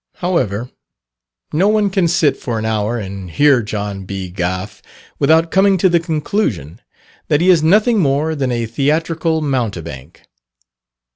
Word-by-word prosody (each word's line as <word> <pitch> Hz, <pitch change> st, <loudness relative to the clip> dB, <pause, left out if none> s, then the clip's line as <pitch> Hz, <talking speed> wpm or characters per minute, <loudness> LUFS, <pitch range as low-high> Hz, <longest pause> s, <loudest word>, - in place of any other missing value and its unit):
However, 125 Hz, -, -2 dB, 0.8 s
no 175 Hz, +6 st, +3 dB
one 210 Hz, -2 st, +2 dB
can 190 Hz, -3 st, +2 dB
sit 160 Hz, -4 st, +2 dB
for 115 Hz, -2 st, -4 dB
an 110 Hz, -, -3 dB
hour 110 Hz, +1 st, -1 dB
and 95 Hz, -3 st, -7 dB
hear 140 Hz, -, +3 dB
John. 105 Hz, -2 st, -5 dB
B. 95 Hz, -1 st, -6 dB
Gough, 90 Hz, +2 st, -4 dB, 0.4 s
without 160 Hz, +3 st, +3 dB
coming 195 Hz, 0 st, +3 dB
to 185 Hz, +1 st, +3 dB
the 170 Hz, -1 st, +3 dB
conclusion 150 Hz, -, -2 dB, 0.5 s
that 150 Hz, -2 st, +2 dB
he 180 Hz, +3 st, +4 dB
is 170 Hz, -3 st, +4 dB
nothing 210 Hz, +8 st, +3 dB
more 150 Hz, 0 st, +1 dB
than 135 Hz, -4 st, -2 dB
a 120 Hz, -1 st, -1 dB
theatrical 160 Hz, +6 st, 0 dB
mountebank. 90 Hz, -, -4 dB
140 Hz, 145 wpm, -17 LUFS, 105-170 Hz, 0.8 s, he